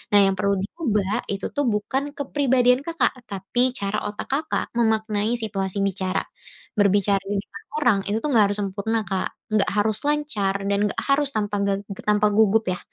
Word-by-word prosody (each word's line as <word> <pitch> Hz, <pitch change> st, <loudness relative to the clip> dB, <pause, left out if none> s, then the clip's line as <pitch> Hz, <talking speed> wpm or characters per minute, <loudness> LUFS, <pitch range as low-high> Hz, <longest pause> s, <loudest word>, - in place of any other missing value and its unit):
Nah, -, -, +8 dB
yang 195 Hz, -, +3 dB
perlu 200 Hz, +1 st, +1 dB
diubah 210 Hz, -, -1 dB
itu 200 Hz, -1 st, -3 dB
bukan 270 Hz, +2 st, -1 dB
kepribadian 260 Hz, -3 st, +2 dB
Kakak, 330 Hz, -1 st, 0 dB, 0.2 s
tapi 200 Hz, +6 st, +1 dB
cara 200 Hz, +1 st, -1 dB
otak 205 Hz, -, -6 dB
Kakak 305 Hz, +3 st, 0 dB
memaknai 220 Hz, -1 st, +1 dB
situasi 200 Hz, -4 st, -2 dB
bicara. 190 Hz, -1 st, -1 dB, 0.5 s
Berbicara 200 Hz, -1 st, +3 dB
di 200 Hz, +1 st, -4 dB
depan 200 Hz, -, -12 dB
orang 240 Hz, -9 st, +3 dB
itu 210 Hz, -, +1 dB
tuh -, -, 0 dB
enggak 220 Hz, -3 st, +6 dB
harus 205 Hz, -, -2 dB
sempurna, 200 Hz, +3 st, -1 dB
Kak, 190 Hz, -2 st, -1 dB, 0.3 s
enggak 210 Hz, -2 st, +3 dB
harus 210 Hz, +1 st, +1 dB
lancar, 290 Hz, -10 st, 0 dB
dan 200 Hz, 0 st, +1 dB
enggak -, -, -3 dB
harus 280 Hz, 0 st, +3 dB
tanpa 210 Hz, -5 st, -2 dB
gag 200 Hz, 0 st, 0 dB, 0.3 s
tanpa 210 Hz, 0 st, +4 dB
gugup 220 Hz, +1 st, +4 dB
ya. 180 Hz, -, -6 dB
210 Hz, 165 wpm, -23 LUFS, 200-245 Hz, 0.5 s, Nah